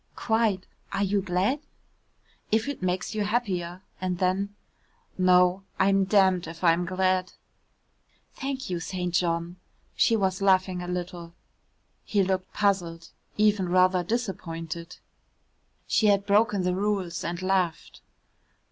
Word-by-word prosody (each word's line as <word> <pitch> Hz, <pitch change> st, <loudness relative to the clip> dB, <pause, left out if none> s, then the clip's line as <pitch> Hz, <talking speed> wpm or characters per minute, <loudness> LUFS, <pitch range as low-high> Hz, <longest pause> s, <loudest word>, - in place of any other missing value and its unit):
"Quite 220 Hz, -4 st, +1 dB, 0.3 s
are 200 Hz, -, +1 dB
you 200 Hz, 0 st, +1 dB
glad?" 190 Hz, +9 st, 0 dB, 0.9 s
"If 220 Hz, +3 st, +2 dB
it 285 Hz, -6 st, -4 dB
makes 180 Hz, 0 st, -1 dB
you 215 Hz, -1 st, -1 dB
happier," 190 Hz, -5 st, -2 dB, 0.2 s
and 185 Hz, -1 st, -1 dB
then, 190 Hz, +3 st, 0 dB, 0.6 s
"No, 180 Hz, 0 st, +4 dB, 0.2 s
I'm 195 Hz, 0 st, +3 dB
damned 190 Hz, -3 st, +3 dB
if 165 Hz, +2 st, -9 dB
I'm 170 Hz, 0 st, +3 dB
glad." 185 Hz, 0 st, 0 dB, 1.0 s
"Thank 270 Hz, 0 st, -4 dB
you, 180 Hz, -2 st, -2 dB
St. 180 Hz, 0 st, -4 dB
John," 170 Hz, 0 st, 0 dB, 0.4 s
she 230 Hz, -, +3 dB
was 190 Hz, -2 st, 0 dB
laughing 185 Hz, -2 st, +2 dB
a 180 Hz, -, -6 dB
little. 175 Hz, -1 st, -5 dB, 0.7 s
He 205 Hz, -2 st, +1 dB
looked 185 Hz, 0 st, -2 dB
puzzled, 175 Hz, -5 st, -1 dB, 0.3 s
even 210 Hz, -3 st, +2 dB
rather 185 Hz, 0 st, +3 dB
disappointed. 170 Hz, -6 st, -4 dB, 0.9 s
She 215 Hz, -, +2 dB
had 200 Hz, -1 st, +3 dB
broken 205 Hz, -1 st, +3 dB
the 180 Hz, 0 st, +1 dB
rules 195 Hz, -3 st, -1 dB
and 170 Hz, +1 st, -3 dB
laughed. 185 Hz, -4 st, -1 dB
185 Hz, 125 wpm, -26 LUFS, 180-200 Hz, 1.0 s, No